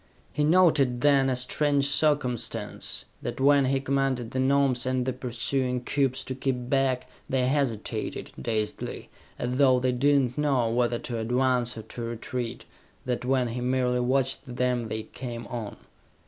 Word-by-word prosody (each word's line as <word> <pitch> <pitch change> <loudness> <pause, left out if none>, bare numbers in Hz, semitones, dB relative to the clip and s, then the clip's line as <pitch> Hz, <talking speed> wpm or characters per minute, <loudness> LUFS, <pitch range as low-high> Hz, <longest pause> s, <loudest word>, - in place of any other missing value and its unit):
He 150 - 0
noted 150 -7 +4
then, 140 -2 +4
a 130 - +1
strange 140 +2 +1
circumstance: 125 -7 0 0.2
that - - -5
when 140 0 +5
he 135 +1 +1
commanded 135 -3 -1
the 130 - -2
Gnomes 130 -1 +2
and 130 -1 0
the 130 - -1
pursuing 125 +1 -1
cubes 135 -1 0
to 130 - -4
keep 130 -1 -3
back, 135 -2 +1 0.2
they 130 -1 +1
hesitated, 130 -5 -2
dazedly, 105 - -3 0.3
as 125 +1 -2
though 130 -2 +5
they 130 0 +1
did 140 +3 +3
not 125 -1 -2
know 135 -6 +2
whether 120 0 +1
to 115 -1 -4
advance 125 +1 +1
or 110 - -6
to 120 - -8
retreat; 115 +1 -4 0.4
that 125 -1 -2
when 130 -2 +1
he 120 +2 -4
merely 125 0 +1
watched 130 +1 0
them, 125 -1 0
they 110 0 -4
came 120 -1 -7
on. 115 -4 -6
125 Hz, 160 wpm, -27 LUFS, 120-135 Hz, 0.4 s, when